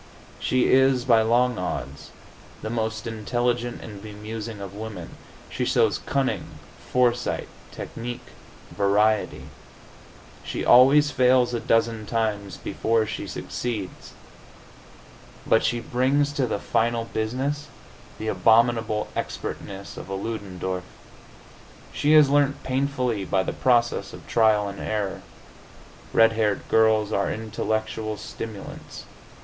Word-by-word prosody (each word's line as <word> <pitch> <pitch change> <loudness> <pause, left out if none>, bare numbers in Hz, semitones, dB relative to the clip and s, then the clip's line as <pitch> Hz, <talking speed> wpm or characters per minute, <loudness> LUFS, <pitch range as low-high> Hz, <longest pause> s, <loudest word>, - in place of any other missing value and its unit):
She 130 -1 +1
is, 130 -1 +4
by 115 -3 +5
long 120 +1 +2
odds, 90 - -5 0.5
the 110 - -3
most 110 -1 -2
intelligent 120 +2 -2
and 105 -3 -9
bemusing 110 +1 -7
of 100 -1 -7
women. 110 +1 -7 0.4
She - - -3
shows - - +2
cunning, 135 -1 -1 0.3
foresight, 125 -1 +1 0.2
technique, 120 +1 -7 0.5
variety. 105 +1 +2 1.0
She - - -4
always 140 +4 +7
fails 125 -2 +3
a 120 - 0
dozen 115 -2 +1
times 105 -4 -2
before 115 -1 0
she 110 - -5
succeeds; 110 -6 -5 1.3
but 115 - +3
she 120 - +1
brings 130 +5 +1
to 135 -3 0
the - - -1
final 115 +2 0
business 130 +7 -2 0.5
the 110 - -5
abominable 110 +2 +3
expertness 100 0 -5
of - - -8
a 95 - -3
Ludendorff; 95 -3 -4 1.1
she 150 +1 +2
has 155 -2 +8
learnt 145 0 +2
painfully 130 -5 -1
by 95 0 +1
the - - -3
process 120 -2 +1
of - - -11
trial 110 -3 +3
and 100 0 -7
error. 105 -3 -2 0.9
Red 115 0 +5
haired 110 -3 0
girls 110 -1 +3
are 100 - +1
intellectual 110 0 -3
stimulants. 110 -2 -8
115 Hz, 115 wpm, -25 LUFS, 105-125 Hz, 1.3 s, has